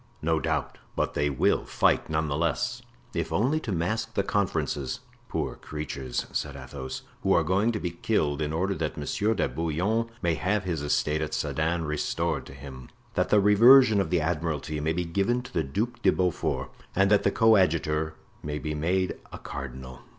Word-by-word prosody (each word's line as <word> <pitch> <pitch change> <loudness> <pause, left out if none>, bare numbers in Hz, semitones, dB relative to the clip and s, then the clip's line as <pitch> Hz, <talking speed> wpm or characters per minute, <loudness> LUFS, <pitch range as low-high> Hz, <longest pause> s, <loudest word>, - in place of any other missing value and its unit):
"No 80 0 +2
doubt; - - -2 0.2
but - - 0
they 75 0 +1
will 70 - +2
fight, - - +2
none 80 0 0
the 70 - -1
less, 85 - -1 0.3
if - - -2
only 130 +9 +2
to 120 - -5
mask 95 +6 -1
the 100 - +2
conferences." 95 -8 -1 0.3
"Poor - - -2
creatures!" 70 -4 -4
said 70 -2 -2
Athos, 65 0 -7 0.2
"who - - +3
are - - +4
going 100 +5 +2
to 110 - -2
be 90 - -3
killed, 75 -2 0
in 75 0 -1
order 95 +5 0
that 80 -3 -3
Monsieur 105 +9 0
de - - +1
Bouillon 90 +9 -1
may 85 -1 +2
have 95 +6 0
his 85 -5 -2
estate 75 +1 +1
at 80 - -2
Sedan 80 +1 -1
restored 75 -1 -1
to - - -10
him, 65 -2 -10 0.2
that - - +1
the 105 - +5
reversion 110 +2 +7
of - - -2
the 90 - +2
admiralty 75 -2 -2
may 80 +2 0
be 90 +1 -1
given 100 +9 0
to 125 - -12
the 80 - +1
Duc 115 - -3
de - - +5
Beaufort, 90 -2 -1 0.2
and 95 +2 +3
that 105 - +5
the - - +3
coadjutor 80 -7 +3 0.3
may 75 0 -3
be 75 +1 -3
made 90 +4 0
a - - -7
cardinal." 65 -1 -7
80 Hz, 185 wpm, -27 LUFS, 75-100 Hz, 0.3 s, reversion